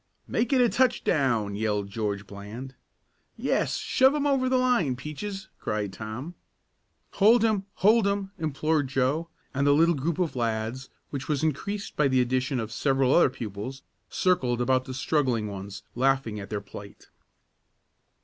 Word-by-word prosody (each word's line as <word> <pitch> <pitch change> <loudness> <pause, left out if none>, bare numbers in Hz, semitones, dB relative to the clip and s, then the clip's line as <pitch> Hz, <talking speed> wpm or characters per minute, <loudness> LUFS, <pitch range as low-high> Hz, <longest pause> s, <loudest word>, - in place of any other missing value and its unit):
"Make 230 - -1
it 265 - +4
a 245 - +5
touchdown!" 135 - +1
yelled 105 -1 -1
George 105 -2 -2
Bland. 105 +7 -8 0.6
"Yes, - - 0
shove 265 +2 +3
him 290 -1 0
over 270 -3 +2
the 260 - +3
line, 245 - +2
Peaches!" 190 +9 -6
cried 105 -2 -2
Tom. 110 - -6 0.8
"Hold 220 +3 +5
him! 210 -3 +1
Hold 215 +1 +4
him!" 200 -1 -1
implored 155 -1 0
Joe, 135 +6 0 0.2
and 140 +1 +1
the 145 - +6
little 165 +3 +4
group 155 +2 -2
of 175 -6 -1
lads, 115 +2 -2 0.2
which 140 -2 -5
was 150 -1 0
increased 200 +7 -2
by 150 - +3
the 130 -1 +2
addition 130 +1 0
of 110 -1 -4
several 135 0 +2
other 175 - +6
pupils, 115 +3 -6 0.3
circled 130 -10 +1
about 130 +1 +2
the 130 - -6
struggling 130 -5 +1
ones, 100 0 -7
laughing 130 -4 +1
at 100 - -8
their 105 -1 -3
plight. 100 0 -12
135 Hz, 155 wpm, -27 LUFS, 110-180 Hz, 0.8 s, the